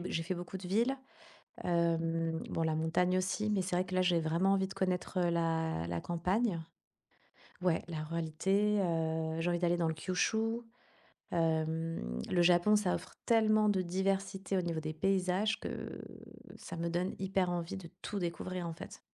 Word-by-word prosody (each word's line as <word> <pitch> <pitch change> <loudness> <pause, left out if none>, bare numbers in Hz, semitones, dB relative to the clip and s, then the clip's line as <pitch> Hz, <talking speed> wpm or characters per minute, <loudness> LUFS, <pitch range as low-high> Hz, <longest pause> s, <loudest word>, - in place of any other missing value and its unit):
b 175 - -5
j'ai 165 - -1
fait 175 +3 -2
beaucoup 175 +2 -6
de 185 -1 -7
villes. 230 +8 +2 0.7
Hem, 165 -1 +1
bon 165 - -1
la 160 -1 +1
montagne 165 +3 +2
aussi, 190 +3 0
mais 200 -3 +2
c'est 180 -1 -1
vrai 180 - +2
que 185 - -5
là 185 - +4
j'ai 175 -2 +3
vraiment 165 +5 +2
envie 190 -1 +2
de 195 - -9
connaître 185 0 -1
heu 175 -1 +3
la 165 - 0
la 85 0 -2
campagne 180 +3 0 1.0
Ouais, 180 -3 +2
la 160 -3 -3
ruralité, 190 +6 +1
heu, 160 -2 0
j'ai 165 - +1
envie 175 - +1
d'aller 175 -1 +3
dans 170 -1 +1
le 160 - -1
Kyushu. 220 +8 0 0.7
Hem, 160 - 0
le 175 - +3
Japon 175 +4 +5
ça 205 -4 +2
offre - - -8
tellement 215 -2 +4
de 195 -2 +2
diversité 195 +1 -1
au 185 - +2
niveau 165 -2 -1
des 155 0 -4
paysages 190 +4 +1
que - - -5 0.6
ça - - -8
me 170 0 -2
donne 175 +2 -1
hyper 190 -1 +1
envie 175 +1 -3
de 180 -3 -8
tout 205 - -4
découvrir 180 0 -3
en 165 - -4
fait. - - -10
175 Hz, 180 wpm, -33 LUFS, 165-190 Hz, 1.0 s, Japon